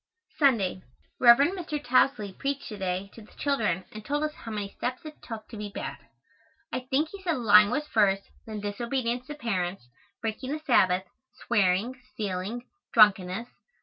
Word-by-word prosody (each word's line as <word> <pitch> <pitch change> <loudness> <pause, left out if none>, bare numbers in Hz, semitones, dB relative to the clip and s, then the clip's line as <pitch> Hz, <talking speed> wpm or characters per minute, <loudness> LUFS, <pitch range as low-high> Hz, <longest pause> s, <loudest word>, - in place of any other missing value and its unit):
Sunday. 225 - +3 0.4
Rev. 235 -1 +9 0.2
Mr. 330 -5 -4
Tousley 245 -6 +2
preached 280 0 -3
to 210 - -7
day 190 +1 -2
to 230 - -12
the 210 - -17
children 215 -11 0
and 215 0 -9
told 290 +6 -1
us 305 0 -1
how 230 - -10
many 205 -2 -3
steps 255 +6 -4
it 305 -1 -10
took 225 -2 -8
to 225 - -8
be 210 0 -5
bad. - - -5 0.8
I - - 0
think 300 +4 +1
he 400 +1 -10
said 335 -5 0
lying 210 -3 +6
was 290 +6 -1
first, 195 -7 +2 0.2
then 215 -2 -5
disobedience 235 +4 -2
to 295 - -6
parents, 190 - -2 0.3
breaking 230 +5 -3
the 310 - -3
Sabbath, 185 -8 +4 0.4
swearing, 210 +4 +1
stealing, 205 +4 -3 0.3
drunkenness. 205 0 +4
225 Hz, 165 wpm, -27 LUFS, 200-265 Hz, 0.8 s, Rev